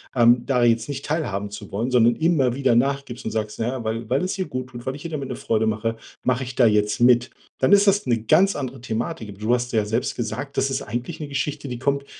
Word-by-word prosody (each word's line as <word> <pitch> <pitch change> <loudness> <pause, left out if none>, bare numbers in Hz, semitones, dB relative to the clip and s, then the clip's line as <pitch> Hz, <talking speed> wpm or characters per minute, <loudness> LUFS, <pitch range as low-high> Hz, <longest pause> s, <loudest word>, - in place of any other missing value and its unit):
ähm, 120 0 +5
da 125 -3 +2
jetzt 115 +2 +2
nicht 140 -1 -5
teilhaben 105 -11 -2
zu 105 -1 -9
wollen, 115 +6 -2
sondern 120 -1 +4
immer 150 -6 +2
wieder 135 -3 +2
nachgibst 135 0 -1
und 110 - -2
sagst: 105 -1 -3
„Na 115 - 0
ja, 125 -1 -3
weil 110 0 -3
weil 135 +6 +1
es 185 +1 -2
ihr 185 - -1
guttut, 130 -1 -6
weil 130 - -2
ich 145 - -10
ihr 165 - -5
damit 140 -3 -4
eine 125 - -3
Freude 110 0 0
mache, 110 +1 -1 0.3
mache 125 +1 +1
ich 125 0 -8
da 125 - +5
jetzt 105 0 +2
mit,“ 120 0 +5 0.3
dann 130 - +4
ist 200 0 +6
das 200 +1 +3
'ne 115 -3 +1
ganz 195 - +4
andere 130 -3 -5
Thematik. 115 +1 -4
Aber, 100 - -10
du 110 +3 +1
hast 125 0 -1
ja 110 -2 +2
selbst 110 +4 -1
gesagt, 125 +4 -4
das 135 - +2
ist 135 +1 -1
eigentlich 120 +3 -5
'ne 150 - -5
Geschichte, 140 +1 -3
die 125 -2 -5
kommt 140 +1 0
125 Hz, 255 wpm, -23 LUFS, 115-140 Hz, 0.3 s, ist